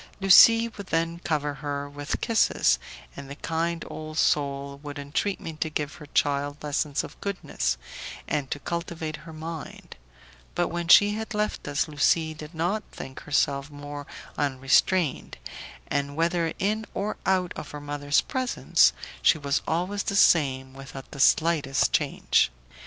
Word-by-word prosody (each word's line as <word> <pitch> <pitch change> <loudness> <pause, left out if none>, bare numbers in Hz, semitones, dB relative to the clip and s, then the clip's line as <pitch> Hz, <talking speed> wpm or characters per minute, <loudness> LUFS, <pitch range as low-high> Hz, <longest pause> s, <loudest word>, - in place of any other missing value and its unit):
Lucie 230 +4 +8
would 200 -4 -10
then 165 0 -1
cover 150 -4 -1
her 145 0 -4
with 145 0 -5
kisses, 200 - +3 0.4
and 135 - -9
the 140 - -7
kind 165 +2 -2
old 155 0 -7
soul 140 -2 0
would 145 0 -7
entreat 145 +8 -2
me 160 - -6
to 155 +1 -3
give 150 -1 -3
her 155 -3 -12
child 145 0 0
lessons 145 0 -1
of - - -11
goodness, 65 - -2 0.5
and 145 -3 -1
to - - -2
cultivate 165 0 -4
her 165 +1 -12
mind; 160 0 -8 0.6
but 175 -1 +1
when 170 0 -3
she 205 +4 +8
had 220 0 -5
left 210 -6 -2
us 145 +1 0
Lucie 155 +2 +2
did 155 +2 -10
not 175 +7 0
think 130 0 -8
herself 140 -1 0
more 145 0 -8 0.3
unrestrained, 140 +3 +1 0.5
and 140 0 -2
whether 165 0 +1
in 215 +3 0
or 205 +2 -2
out 185 -2 +2
of 150 - -7
her 150 - -7
mother's 145 0 0
presence, 255 -1 +2 0.3
she - - +5
was 140 -1 0
always 180 +5 -1
the 200 - -2
same 135 -8 +3
without 135 0 -10
the 140 - -9
slightest 150 -2 +3
change. - - +2
155 Hz, 150 wpm, -26 LUFS, 145-170 Hz, 0.6 s, Lucie